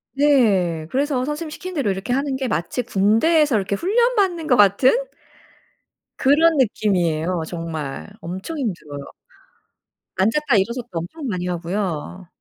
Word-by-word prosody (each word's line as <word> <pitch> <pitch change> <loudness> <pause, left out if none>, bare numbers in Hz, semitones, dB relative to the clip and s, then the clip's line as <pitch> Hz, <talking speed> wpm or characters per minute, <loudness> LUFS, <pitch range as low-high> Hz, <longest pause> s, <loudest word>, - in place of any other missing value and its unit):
네. 205 - +3
그래서 270 -1 0
선생님 300 +2 -4
시키는 365 +4 -7
대로 275 -9 0
이렇게 190 +6 -3
하는 275 0 0
게 260 -1 -2
마치 210 +5 -2
군대에서 235 - +3
이렇게 200 -1 0
훈련받는 395 - +1
것 250 - +4
같은? 205 +5 +5 1.3
그런 305 +3 +4
느낌이에요 180 - +1
정말. 155 - -5
엄청 190 - -6
힘들어요. 150 - -5 1.0
앉았다 230 +6 +2
일어섰다 235 +5 -1
엄청 275 - -7
많이 180 -5 -3
하고요. 180 0 -4
220 Hz, 305 characters per minute, -21 LUFS, 180-290 Hz, 1.3 s, 같은